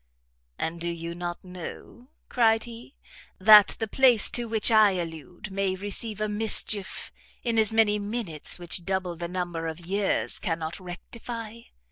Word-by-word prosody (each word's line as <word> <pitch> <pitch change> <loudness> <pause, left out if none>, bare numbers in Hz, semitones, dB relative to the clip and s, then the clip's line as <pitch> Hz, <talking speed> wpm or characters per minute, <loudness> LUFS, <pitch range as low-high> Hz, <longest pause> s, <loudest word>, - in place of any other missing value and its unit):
"And, 165 +1 -3
do 170 - -1
you 170 0 -5
not 175 0 -5
know," 185 +6 -10 0.2
cried 225 -2 +3
he, 235 +3 -10 0.4
"that 210 +1 +7
the 225 - -3
place 245 -2 +4
to 240 - +2
which 220 +1 +2
I 215 -3 +6
allude 175 +2 -6
may 190 -1 -1
receive 205 +2 -3
a 215 - 0
mischief 210 -1 +1 0.3
in 230 -2 +1
as 220 -1 +3
many 220 -2 +3
minutes 205 -7 -3
which 175 0 -2
double 185 -1 -2
the 170 +1 -5
number 175 -2 -4
of 165 +2 -7
years 200 +2 -1
cannot 165 0 -3
rectify? 225 +5 -8
195 Hz, 150 wpm, -26 LUFS, 175-225 Hz, 0.4 s, that